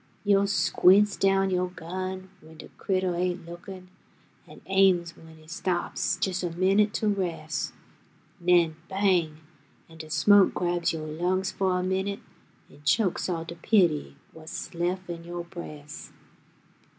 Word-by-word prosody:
Yo' 200 -1 +3
squints 205 0 +4
down 195 0 +2
yo' 180 0 +1
gun 185 +2 -6
w'en 160 0 -15
de - - -11
critter 185 -2 0
ain't 180 0 -2
lookin', 180 +2 -10 0.6
An' - - -13
aims 190 -3 +3
w'en 160 -1 -16
he 155 0 -18
stops 175 +1 -2
jes' 185 -1 -2
a 175 - -2
minute 195 +5 +2
to 215 - 0
res', 175 -6 -2 0.7
'N'en 170 -2 +4
bang, 180 -6 +1 0.5
an' 165 0 -16
de 155 -1 -8
smoke 195 +6 +5
grabs 175 -1 0
yo' 160 -1 -5
lungs 180 +5 -1
fo' 190 -1 0
a 180 0 0
minute 190 +2 -2 0.5
An' - - -17
chokes 190 +2 +1
all 165 -2 -2
de 165 - -7
pity 170 - +1 0.2
what's 160 0 -8
lef' 180 +2 -2
in 170 -1 -6
yo' 175 0 -6
bres'. 155 -4 -9
180 Hz, 145 wpm, -27 LUFS, 165-190 Hz, 0.7 s, smoke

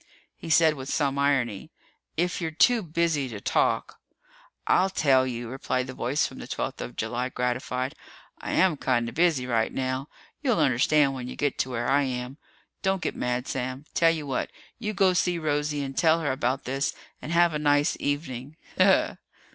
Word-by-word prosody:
He - - -9
said 160 -1 +5
with 135 -2 -7
some 140 -2 0
irony, 130 -8 0 0.5
"If 175 +2 0
you're 165 - -1
too 225 +9 +4
busy 165 -5 0
to 105 -3 -6
talk - - 0 0.4
" - - -25 0.3
"I'll 190 +1 +3
tell 135 -8 +3
you," 120 -1 -4
replied 130 0 -2
the 130 - -7
voice 135 +4 0
from - - -7
the - - -8
twelfth - - -4
of - - -6
July, 125 +2 -2
gratified. 125 +1 -2 0.5
"I - - -4
am 185 -5 +3
kind 120 -3 +1
of 115 - -6
busy 160 -6 +2
right 115 -3 +1
now. 130 +2 -2 0.3
You'll 255 -7 +1
understand 140 0 +3
when 125 -2 -6
you - - -7
get 145 -2 -1
to 130 - 0
where 120 -1 -2
I 140 +2 +4
am. 130 +1 -4 0.4
Don't 190 -1 0
get - - -2
mad, 125 0 -2
Sam. 130 +2 -4
Tell 165 - +4
you 160 -2 -1
what 135 -3 -2 0.3
you 215 -3 -2
go 190 -2 +4
see 175 0 +1
Rosie 150 -2 -1
and 135 -1 -6
tell 165 +1 +4
her 145 -4 0
about 130 0 -1
this 135 +2 -2 0.3
and 155 - -6
have 170 -1 +4
a 150 - -1
nice 145 +1 +3
evening. 145 0 -3 0.2
Ha - - +8
ha!" - - +3
140 Hz, 195 wpm, -26 LUFS, 125-160 Hz, 0.5 s, Ha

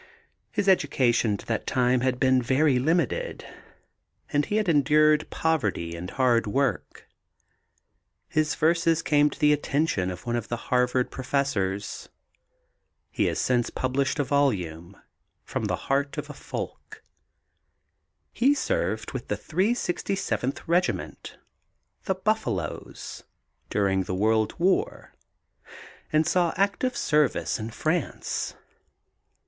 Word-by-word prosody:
His 200 - -2
education 125 - +3
to - - -12
that 115 - -2
time 125 0 +2
had 130 -1 0
been 130 -1 +4
very 130 +2 +2
limited 160 - 0 0.9
and 145 0 +3
he 210 - -1
had 215 -2 +1
endured 150 0 +4
poverty 105 - -1
and 90 +2 -6
hard 120 -3 +2
work. 135 +6 -1 1.2
His 155 0 0
verses 165 0 +2
came 150 -1 +4
to - - -10
the 150 -2 +5
attention 145 - 0
of 90 +4 -7
one 120 0 -1
of 115 -2 -3
the 120 - -3
Harvard 125 0 +2
professors. 105 -7 -2 1.0
He - - 0
has - - 0
since 120 -2 +1
published 135 +2 -1
a 145 - +2
volume, 100 - -1 0.5
From - - -3
the - - 0
Heart 140 +2 0
of 150 0 -5
a - - -9
Folk. - - -7 1.3
He 275 +4 +3
served - - -1
with - - -6
the - - -1
367th 190 - -1
Regiment, 175 +2 -1 0.7
"The 190 - 0
Buffaloes," 190 - -3 0.5
during 95 -2 +1
the 95 - -3
World 110 +2 +1
War 195 - 0 1.0
and 155 0 +3
saw 175 -1 +1
active 200 +6 0
service 150 -5 +1
in 110 +1 -4
France. 155 +7 -2
140 Hz, 120 wpm, -26 LUFS, 120-160 Hz, 1.3 s, the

